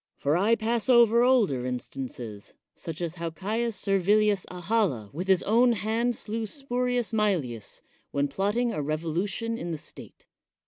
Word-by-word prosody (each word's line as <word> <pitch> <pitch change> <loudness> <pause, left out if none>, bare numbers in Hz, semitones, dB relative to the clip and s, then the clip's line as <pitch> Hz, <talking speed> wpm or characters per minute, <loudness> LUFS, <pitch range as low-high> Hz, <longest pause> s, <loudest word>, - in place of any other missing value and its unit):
For 145 +2 +1
I 205 +6 +3
pas 230 +2 -1
over 235 -1 +6
older 230 - +3
instances, 125 -4 -6 0.2
such 165 0 -7
as 170 0 -3
how 170 - -1
Caius 215 +7 -2
Servilii] 205 +2 +3
Ahala 180 - -1
with 180 +6 -4
his 190 -2 +4
own 235 +3 +4
hand 225 +3 0
slew 220 +1 -4
Spurius 250 -2 -1
Maelii] 175 - -1 0.3
when 140 0 0
plotting 205 - 0
a 150 - -2
revolution 170 +10 -2
in 175 - -5
the 165 - -3
state. - - -11
200 Hz, 145 wpm, -27 LUFS, 155-230 Hz, 0.3 s, over